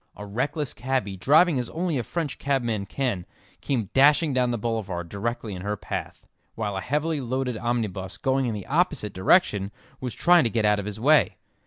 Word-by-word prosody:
A 105 - -8
reckless 130 +7 -2
cabby, 110 -3 -2
driving 150 - +4
as 120 - -3
only 165 -4 -1
a - - -2
French 160 +2 -4
cabman 120 -7 -1
can, 120 -10 -2 0.4
came 115 -8 -2
dashing 145 +2 +5
down 125 -1 +2
the 120 - -1
boulevard 100 -7 -3
directly 110 +2 -3
in 90 - -6
her 105 +2 -2
path, - - -6 0.3
while 105 -3 -3
a 95 - -2
heavily 150 +4 -1
loaded 130 0 -2
omnibus 105 -6 -2
going 135 -1 +1
in 115 - -2
the 100 - -6
opposite 155 - 0
direction 100 - +3 0.3
was 125 -3 -5
trying 175 -2 +5
to 115 - +1
get 110 -1 0
out 105 -1 +3
of 100 - -5
his 105 0 -5
way. 150 +6 +4
120 Hz, 190 wpm, -25 LUFS, 105-140 Hz, 0.4 s, dashing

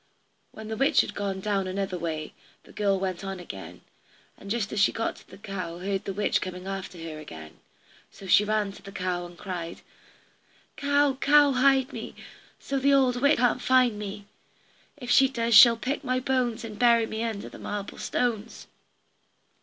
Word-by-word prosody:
When 220 0 -10
the 220 - -4
witch 275 - +4
had - - -5
gone 195 -2 -3
down 195 -2 -1
another 190 -1 -3
way, 155 -2 -4 0.3
the - - -17
girl 200 -2 0
went 185 -1 -3
on 195 -1 -5
again, 100 - -9 0.5
and 200 - -12
just 215 -1 -2
as 210 - -1
she 200 - +4
got 225 - -2
to - - -18
the - - -12
cow 185 -4 -6
heard 195 +2 -3
the - - -3
witch 205 +2 0
coming 180 0 -6
after 195 -2 -6
her 155 -2 -7
again, 80 - -11 0.5
so 195 - -14
she 190 +2 +5
ran 210 -1 0
to - - -14
the 200 - -11
cow 180 -2 -3
and 175 0 -15
cried: 175 -3 -6 0.9
"Cow, 285 -2 +2
cow, 290 0 +5
hide 265 0 +3
me, - - -7 0.4
So 275 0 -2
the 280 +1 +4
old 250 -2 +2
witch 285 +2 +4
can't 245 +1 +2
find 250 -5 +3
me; 205 0 -7 0.7
If 245 -3 -5
she 270 -1 +6
does 235 -3 -1
she'll 230 +2 +9
pick 260 +5 -3
my 255 0 0
bones, 255 -3 -1
And 210 -2 -9
bury 235 -2 +5
me 220 0 -5
under 220 -3 -4
the - - -12
marble 205 -1 -6
stones." 230 -2 -2
210 Hz, 185 wpm, -26 LUFS, 190-250 Hz, 0.9 s, she'll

